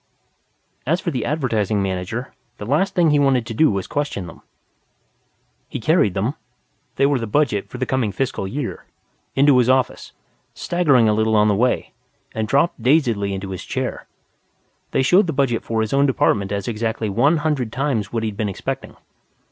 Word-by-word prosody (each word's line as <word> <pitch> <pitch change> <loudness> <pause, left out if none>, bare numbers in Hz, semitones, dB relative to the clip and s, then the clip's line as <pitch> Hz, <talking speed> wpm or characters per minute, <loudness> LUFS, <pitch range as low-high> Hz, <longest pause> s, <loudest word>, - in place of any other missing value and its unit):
As 170 +5 +2
for 170 - -3
the 125 -6 -2
Advertising 110 -9 0
Manager, 95 +6 -3 0.2
the 105 - -7
last 150 - +1
thing 170 -3 +4
he 145 - +3
wanted 135 -4 +2
to 115 - -5
do 155 +8 +4
was 100 -2 -2
question 145 -10 -3
them. 85 - -12 1.3
He - - -5
carried 110 - +2
them 105 +8 0 0.6
(they 140 - +3
were 140 -2 +2
the 115 - -4
budget 105 -4 0
for - - -8
the 130 - -1
coming 125 -6 0
fiscal 120 -2 -2
year) 140 +9 -5 0.5
into 140 0 +5
his 125 0 +2
office, 130 -2 0 0.4
staggering 145 -10 +2
a 105 - +3
little 110 +1 +1
on 105 0 +4
the 105 - +2
way, 125 +4 0 0.4
and 110 -1 -3
dropped 140 +2 +1
dazedly 120 -7 +2
into 95 0 -5
his 95 - -6
chair. - - -4 0.8
They - - +1
showed 180 +8 +4
the 165 - -1
budget 130 -4 +1
for 115 -1 -1
his 110 - -2
own 140 +1 +4
department 100 -6 +1
as 100 -1 -3
exactly 110 -1 -2
one 125 +11 +3
hundred 150 -7 -1
times 130 -7 -1
what 115 -1 -2
he'd 110 -2 -3
been 105 0 -2
expecting. 95 - -5
120 Hz, 180 wpm, -21 LUFS, 105-140 Hz, 1.3 s, into